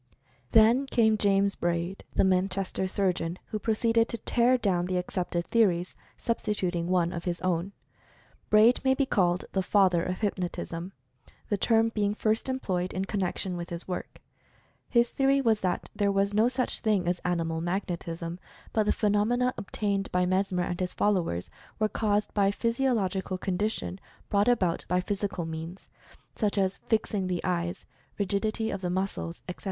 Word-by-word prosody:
Then 230 +5 +5
came 220 -4 +3
James 200 -1 +2
Braid, 175 +2 -2
the - - +4
Manchester 190 0 0
surgeon, 180 -3 -1
who 215 - -3
proceeded 225 +1 +2
to 235 - -3
tear 240 +3 +3
down 180 -6 0
the 185 0 0
accepted 180 -1 -2
theories, 185 -6 +2 0.2
sub 230 -1 -1
stituting 180 -5 -1
one 175 -1 +1
of 170 - -5
his 175 -1 -2
own. 185 +1 0 0.8
Braid 215 +3 +5
may 265 0 +3
be 275 - +1
called 180 -7 +1
the 190 - +1
father 185 -3 +3
of 185 +3 -3
"Hypnotism," 180 -3 -3 0.6
the 205 - +1
term 225 +2 +3
being 210 -2 0
first 220 +4 0
employed 185 -9 -2
in 190 +1 -1
connection 190 -2 -2
with 175 0 -5
his 170 0 -6
work. 180 - -5 0.7
His 235 -1 +3
theory 275 0 +3
was 225 -5 +2
that 180 -1 -1
there 200 -1 +2
was 200 +1 +1
no 215 +3 +4
such 255 0 -1
thing 205 -6 +1
as 175 0 0
"animal 165 -2 -1
magnetism," 170 -1 -3 0.3
but 215 -2 +2
the - - +4
phenomena 225 +4 +2
obtained 200 -1 -2
by 180 0 +2
Mesmer 185 -1 +1
and 175 0 -3
his 180 -1 -2
followers 180 - 0 0.3
was 215 0 0
caused 210 -1 0
by 200 -2 +3
a - - +3
physiological 220 -6 0
condition 190 +1 -2 0.3
brought 205 +2 +2
about 190 -9 +2
by 180 +1 +2
physical 195 -2 -2
means, 165 +3 -7 0.5
such 210 -2 -1
as 190 -1 +1
fixing 210 -3 +1
the 180 -2 -2
eyes, 175 -1 -2 0.3
rigidity 215 +2 -1
of 195 - -4
the 180 - -2
muscles, 185 -2 -3
etc. 180 - -6
195 Hz, 165 wpm, -28 LUFS, 180-215 Hz, 0.8 s, Then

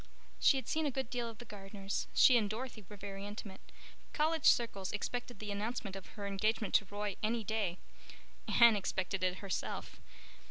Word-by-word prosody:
She 275 - +5
had 260 - -4
seen 315 -1 +1
a - - +2
good 265 -2 -3
deal 240 -2 -2
of 225 - -10
the 240 - -10
Gardners; 195 -2 -4
she 255 - +8
and 215 -4 +3
Dorothy 225 0 -5
were 210 - -9
very 195 0 -6
intimate; 205 -1 -7 0.5
college 315 0 +1
circles 200 -5 +3
expected 245 +3 -3
the 210 0 -5
announcement 205 0 -3
of 195 - -8
her 205 - -4
engagement 210 +2 0
to 205 - +5
Roy 205 -1 -3
any 225 +1 0
day. 205 -5 -1 0.7
Anne 235 -2 +7
expected 190 -1 -1
it 185 0 +2
herself. 195 - -4
210 Hz, 175 wpm, -34 LUFS, 195-235 Hz, 0.7 s, she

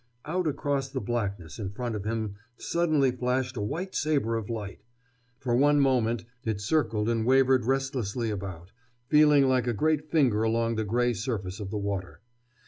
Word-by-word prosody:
Out 180 +2 -1
across 140 -2 -1
the 135 -1 -3
blackness 100 -7 -3
in 100 -3 -3
front 120 +4 -4
of 105 -1 -5
him 110 -2 -2 0.2
suddenly 155 -6 +1
flashed 125 +1 -1
a 110 - -3
white 170 - -3
saber 140 -7 +1
of 115 -1 -4
light. 105 -4 -5 0.6
For 120 -2 -1
one 145 +3 +4
moment 120 -5 +2 0.2
it 110 -4 -2
circled 110 -2 0
and 115 -1 +1
wavered 130 0 +4
restlessly 130 -4 -1
about, 95 -3 -6 0.4
feeling 150 -2 +6
like 130 -1 +2
a 120 - +1
great 155 +5 0
finger 130 -10 +3
along 115 +1 +1
the 110 -1 -1
gray 120 +3 +1
surface 110 -6 -4
of 100 -2 -5
the 105 - -3
water. 100 -2 -4
120 Hz, 170 wpm, -28 LUFS, 105-135 Hz, 0.6 s, feeling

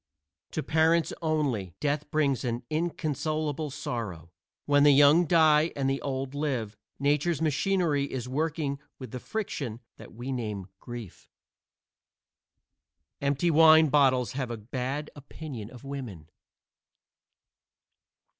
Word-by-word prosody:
To - - -2
parents 160 +1 +2
only, 140 - -1
death 145 0 -1
brings 140 -6 +1
an 120 0 -2
inconsolable 155 -1 -2
sorrow. 105 - -5 0.3
When 145 -1 +4
the 145 - +7
young 145 +5 +6
die 160 -1 +5
and 135 -1 -1
the 135 0 0
old 135 -1 -3
live, 130 -8 -2 0.2
nature's 145 +3 +1
machinery 160 -1 +1
is 125 -2 -4
working 150 0 -2 0.2
with 130 -4 -9
the 125 - -5
friction 140 - -4 0.2
that - - -12
we 120 +4 -6
name 105 -6 -4
grief. 120 -6 -9 1.9
Empty 140 +4 +1
wine 160 0 +7
bottles 130 -4 +3
have 130 -2 -3
a 120 - -4
bad 130 +6 -4
opinion 140 -6 -8
of 125 +1 -13
women. 125 - -7
140 Hz, 115 wpm, -28 LUFS, 125-155 Hz, 1.9 s, the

